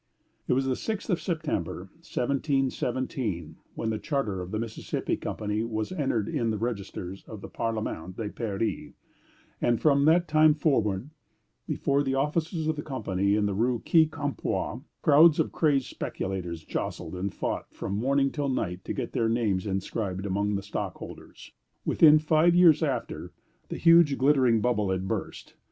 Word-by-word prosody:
It - - +3
was 135 +1 +1
the 130 -1 0
sixth 220 - -3
of 175 - 0
September, 155 - -2 0.2
1717, 130 - -2 0.2
when 110 - -2
the 110 - -2
charter 110 - -2
of 90 - -7
the 110 - -3
Mississippi 110 0 -3
Company 105 0 -3
was 110 -2 -3
entered 135 - -1
in 125 -8 -1
the 110 - -1
registers 100 -4 -5
of 110 -3 -9
the - - -7
Parliament 105 -6 -4
of 105 -3 -5
Paris; 110 -1 -3 0.7
and 120 -1 +2
from 140 -2 +3
that 170 +2 +4
time 155 0 +5
forward, 125 - 0 0.6
before 140 0 +1
the 135 -2 0
offices 155 +4 -1
of 160 -1 0
the - - -2
Company 100 -8 -1
in 105 -1 +1
the 100 - 0
Rue 120 +5 +1
Quincampoix, 155 -3 +1 0.2
crowds 155 +2 +6
of - - +1
crazed 140 -5 +2
speculators 90 -4 -4
jostled 85 -1 -4
and 95 +2 -3
fought - - -4
from 95 - -5
morning 135 +6 +1
till 145 -2 -2
night 90 -8 -2
to - - -3
get - - -4
their 115 -1 +1
names 105 -5 0
inscribed 95 0 -3
among 100 +1 0
the 100 - -3
stockholders. 100 - -7 0.3
Within 155 -1 +6
five 155 +3 +3
years 175 -4 +6
after, 135 -7 -3 0.4
the - - -4
huge 165 -4 +5
glittering 130 -5 +4
bubble 105 -5 +1
had 95 0 -1
burst. - - -5
120 Hz, 160 wpm, -27 LUFS, 100-150 Hz, 0.7 s, crowds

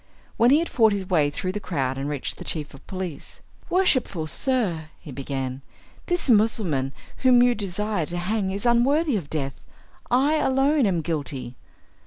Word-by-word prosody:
When 235 - +4
he 280 - +6
had 335 +2 0
fought 220 -3 +3
his 195 -2 -3
way 155 -6 +3
through 185 +5 -3
the 210 - -4
crowd 135 -9 -2
and 135 +2 -3
reached 145 -3 -3
the - - -8
chief 150 -3 -4
of 135 - -15
police, 185 -6 -6 0.3
"Worshipful 260 - +1
sir," 190 - -1
he 150 - -10
began, 135 -1 -4 0.5
"this 350 -3 0
Mussulman 205 - +2 0.3
whom 250 -2 +5
you 245 0 +4
desire 205 -4 -2
to 175 - -3
hang 190 +2 -1
is 200 +4 -3
unworthy 270 +5 +3
of 170 -8 -3
death; 135 -3 -3 0.5
I 280 +5 +3
alone 270 -1 +3
am 175 -4 +1
guilty. 140 -6 -4
190 Hz, 170 wpm, -24 LUFS, 150-245 Hz, 0.5 s, he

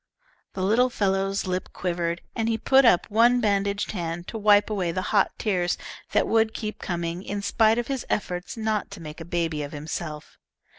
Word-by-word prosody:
The 185 - -3
little 230 +6 +3
fellow's 195 -3 0
lip 185 0 -2
quivered, 170 -1 -2
and 225 0 0
he 225 - +1
put 265 +4 +4
up 180 -7 +4
one 240 +3 +5
bandaged 200 -2 0
hand 170 -2 -4
to 225 - -5
wipe 205 -1 +5
away 185 -5 0
the 185 +2 -2
hot 200 -2 +4
tears 180 -5 0 0.3
that - - +2
would 225 0 +2
keep 215 -1 -4
coming, 170 0 -3
in 200 +1 -4
spite 220 +2 +3
of 240 - 0
his 270 0 -3
efforts 180 0 -3
not 220 -1 -1
to 200 - -9
make 155 0 -9
a - - -7
baby 165 -3 -1
of 145 +1 -6
himself. 150 +1 -6
195 Hz, 190 wpm, -25 LUFS, 175-220 Hz, 0.3 s, one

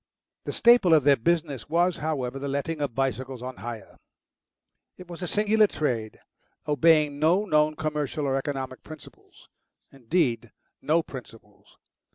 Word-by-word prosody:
The - - -3
staple 235 -8 +5
of 150 - +3
their 140 0 +5
business 145 -1 -1
was, 175 +2 +2
however, 135 -4 -3
the 140 - -4
letting 140 +3 -3
of 140 -5 -3
bicycles 130 -1 -3
on 130 0 -7
hire. 115 -3 -9 1.0
It 180 - -12
was 175 0 -10
a 180 - -3
singular 215 +3 +3
trade, 120 - -3 0.5
obeying 150 -1 +3
no 175 +7 +3
known 155 -4 +2
commercial 150 -1 -3
or 135 -1 0
economic 135 -2 -4
principles 155 -1 -14 0.4
indeed, 125 - -1 0.3
no 165 +2 +1
principles. 115 -7 -13
145 Hz, 140 wpm, -26 LUFS, 130-165 Hz, 1.0 s, staple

